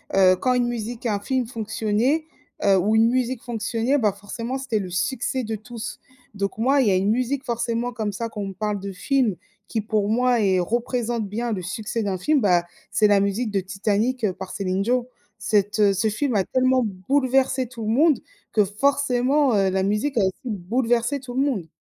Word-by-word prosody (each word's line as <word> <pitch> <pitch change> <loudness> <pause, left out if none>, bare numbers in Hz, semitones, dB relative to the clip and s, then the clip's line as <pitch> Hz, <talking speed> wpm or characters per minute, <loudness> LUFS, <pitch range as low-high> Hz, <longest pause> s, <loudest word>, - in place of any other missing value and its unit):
heu, 185 -1 +6
quand 255 +7 +1
une 245 -1 +2
musique, 240 +1 -5
un 210 -3 0
film 255 +4 -1
fonctionnait, 225 +5 0 0.4
heu, 195 -1 +5
ou 210 +4 +2
une 225 +1 +5
musique 255 -1 -1
fonctionnait, 235 +4 0
bah, 210 -4 +2
forcément 230 +5 -5
c'était 255 -5 -1
le 190 -2 -5
succès 260 +7 -1
de 220 0 -3
tous. 230 +1 -7 0.3
Donc 200 -1 -3
moi 270 +5 +3
il 235 - +2
y - - +4
a - - +3
une 195 +3 +2
musique 255 +3 -1
forcément 235 0 -2
comme 215 -3 -2
ça 230 +3 -3
quand 215 -2 -6
on 200 - -3
me 195 - -6
parle 210 +1 -2
de 200 +1 -5
film, 230 +2 +1 0.3
qui 220 - -2
pour 210 -1 0
moi 245 +1 +2
est 190 -3 +3
représente 235 +2 -1
bien 230 +4 -3
le 195 -4 -2
succès 210 +5 -3
d'un 195 -2 -1
film 290 +10 +2
bah, 180 -5 +3 0.3
c'est 215 - +3
la 205 -1 +4
musique 200 +4 0
de 200 - +1
Titanic, 210 +6 -1
heu, 190 - 0
par 190 0 -8
Céline 190 -1 -1
Dion. 245 +3 +1 0.3
Cette, 205 0 +1
heu 200 -2 +5
ce 195 +4 +1
film 250 +5 -1
a 195 - +3
tellement 255 0 +2
bouleversé 260 +5 +1
tout 235 -1 -8
le - - -1
monde 290 +1 +4 0.3
que 210 -2 +4
forcément, 270 +4 +2
heu, 195 -1 +3
la 190 0 0
musique 210 +8 0
a - - +4
aussi 190 -1 +1
bouleversé 235 +5 0
tout 250 -2 -9
le 265 - +2
monde. 225 - -1
225 Hz, 210 wpm, -23 LUFS, 200-250 Hz, 0.4 s, heu